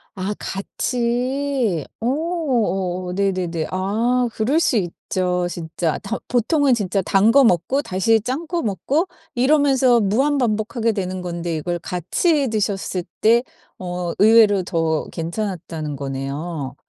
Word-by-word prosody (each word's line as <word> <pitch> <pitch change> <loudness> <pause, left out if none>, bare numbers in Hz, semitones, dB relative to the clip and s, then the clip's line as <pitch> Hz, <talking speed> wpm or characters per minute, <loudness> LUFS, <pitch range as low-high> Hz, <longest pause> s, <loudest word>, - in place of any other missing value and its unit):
아 195 +2 -2
같이. 245 - -1 0.2
어 290 +8 0 0.2
어 185 -5 0
네네네. 180 -4 -1
아 230 +7 +1
그럴 265 +9 +1
수 280 - +2
있죠 180 -1 -1
진짜. 165 -1 -3
더 195 - -4
보통은 265 +3 +2
진짜 200 -3 0
단 200 +5 +4
거 275 +1 +6
먹고 230 - +2
다시 205 +5 +2
짠 270 +8 -3
거 345 -3 -2
먹고 275 - 0 0.3
이러면서 265 -2 +4
무한 265 +9 +2
반복 220 -1 -1
하게 230 -1 +2
되는 185 -3 -3
건데 170 -1 -3
이걸 175 +3 -2
같이 270 - 0
드셨을 195 -4 -1 0.2
때 235 +3 +5 0.4
어 180 -1 -3
의외로 210 -3 +6
더 165 -2 0
괜찮았다는 165 -4 -4
거네요. 140 +2 -4
200 Hz, 240 characters per minute, -21 LUFS, 175-245 Hz, 0.4 s, 거